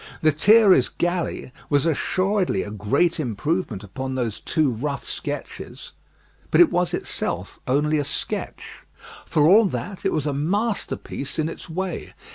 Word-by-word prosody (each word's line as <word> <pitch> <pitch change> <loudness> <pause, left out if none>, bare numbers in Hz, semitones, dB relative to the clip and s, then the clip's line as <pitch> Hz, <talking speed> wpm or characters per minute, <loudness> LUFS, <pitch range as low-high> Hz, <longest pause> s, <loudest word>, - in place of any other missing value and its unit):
"Lethierry's 190 +7 +5
Galley" 175 -6 -2 0.2
was 145 0 +2
assuredly 185 - +1
a 105 - -7
great 140 - +1
improvement 130 - -2
upon 130 +6 -5
those 120 -4 -2
two 155 -5 +1
rough 140 +5 -3
sketches; - - -6 0.6
but - - +3
it 350 - +7
was 180 0 +1
itself - - -4
only 150 +3 +2
a - - 0
sketch. 140 - -5 0.5
For 155 -3 +2
all 210 +6 +7
that, 195 0 -4
it - - +1
was 155 -3 -1
a 145 - 0
masterpiece 180 - -2
in 155 -1 +1
its 165 - -8
way. 185 +1 -4
155 Hz, 140 wpm, -23 LUFS, 135-185 Hz, 0.6 s, it